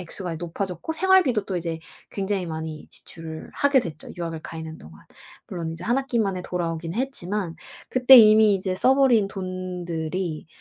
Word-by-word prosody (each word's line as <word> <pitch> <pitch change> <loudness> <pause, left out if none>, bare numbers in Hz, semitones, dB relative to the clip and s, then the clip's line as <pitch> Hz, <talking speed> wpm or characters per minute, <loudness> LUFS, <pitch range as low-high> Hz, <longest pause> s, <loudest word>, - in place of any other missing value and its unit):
액수가 180 0 -4
이제 - - -5
높아졌고 180 - -4
생활비도 320 - +3
또 185 - -2
이제 165 -1 -4 0.3
굉장히 195 -2 -2
많이 160 -1 -6
지출을 160 -1 -8
하게 280 -2 +3
됐죠 155 -6 -8
유학을 165 -2 -4
가 165 - -8
있는 160 0 -7
동안. 80 0 -14 0.5
물론 165 -3 -4
이제 165 +2 -8
1 240 +4 +2
학기 265 -3 -2
만에 195 -3 -1
돌아오긴 165 -1 -3
했지만 210 -8 -2 0.4
그때 255 +1 +8
이미 215 -1 +7
이제 185 -1 -2
써 260 +6 +4
버린 240 -7 +4
돈들이 180 -3 -4
185 Hz, 355 characters per minute, -24 LUFS, 165-215 Hz, 0.5 s, 그때